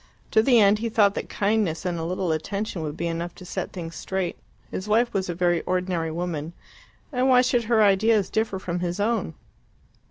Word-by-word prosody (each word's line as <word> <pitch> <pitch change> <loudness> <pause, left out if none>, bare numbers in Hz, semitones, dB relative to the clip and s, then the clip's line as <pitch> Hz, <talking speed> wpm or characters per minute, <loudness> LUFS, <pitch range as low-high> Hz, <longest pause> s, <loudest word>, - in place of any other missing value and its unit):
To 220 - +5
the 240 0 +5
end 205 0 +5
he 230 +1 -2
thought 210 -3 +4
that - - -5
kindness 200 -5 0
and 175 -2 -1
a - - -3
little 180 +1 -1
attention 195 +4 -3
would 155 0 -4
be 170 - -2
enough 170 +1 -3
to 180 - -12
set - - -4
things 170 -3 -7
straight. 190 -2 -3 0.4
His 185 - -5
wife 230 +3 +2
was 190 -2 -1
a 175 - -2
very 175 -1 +2
ordinary 180 -3 -1
woman, 165 -1 -4 0.6
and 255 +1 +2
why 250 -1 +6
should 245 -2 +1
her 225 -1 +4
ideas 205 +1 +3
differ 220 -3 0
from 180 -2 -3
his 175 +1 -3
own? 205 -6 0
190 Hz, 200 wpm, -25 LUFS, 170-220 Hz, 0.6 s, why